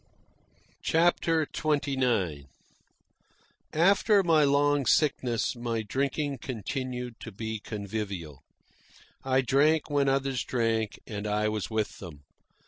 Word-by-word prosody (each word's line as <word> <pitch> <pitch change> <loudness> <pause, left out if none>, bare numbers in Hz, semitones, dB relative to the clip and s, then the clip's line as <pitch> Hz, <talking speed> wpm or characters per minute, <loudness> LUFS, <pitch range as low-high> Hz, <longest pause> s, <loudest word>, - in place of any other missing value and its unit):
CHAPTER 165 -1 +2
XXIX 130 - 0 1.3
After 195 +5 +4
my 160 -3 +4
long 145 -1 +2
sickness 130 -6 +1
my 115 -2 -2
drinking 140 +4 -2
continued 125 0 -5
to 115 - -8
be 110 +2 -5
convivial. 100 - -5 0.8
I 130 0 +2
drank 145 +5 +2
when 140 -1 +2
others 135 -2 0
drank 115 -3 -1
and 105 -1 -5
I 105 +1 +1
was 105 -5 -3
with 110 -1 -2
them. 75 -6 -10
125 Hz, 105 wpm, -28 LUFS, 110-145 Hz, 1.3 s, After